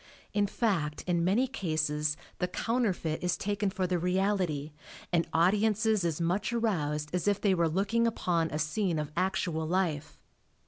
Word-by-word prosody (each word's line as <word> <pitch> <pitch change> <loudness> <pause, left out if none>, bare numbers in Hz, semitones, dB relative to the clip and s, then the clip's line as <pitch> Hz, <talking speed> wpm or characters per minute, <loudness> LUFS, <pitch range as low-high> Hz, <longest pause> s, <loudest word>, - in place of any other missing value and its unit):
In 205 -1 +2
fact 175 -10 -1
in 175 -2 +1
many 200 +9 +3
cases 155 - -1 0.2
the 180 - +1
counterfeit 185 -6 -1
is 180 -1 +1
taken 205 0 -1
for 185 -1 -1
the 180 -1 0
reality 180 -5 0 0.4
and 170 -1 +2
audiences 210 +4 +3
as 165 -2 -1
much 180 +6 0
aroused 150 -11 -1
as 180 +1 -1
if 205 -1 +2
they 200 -3 +3
were 170 -2 +2
looking 205 +7 +1
upon 170 -7 0
a 150 - -3
scene 160 +3 0
of 150 -1 -3
actual 170 -3 0
life. 165 -4 -1
180 Hz, 155 wpm, -30 LUFS, 160-205 Hz, 0.4 s, many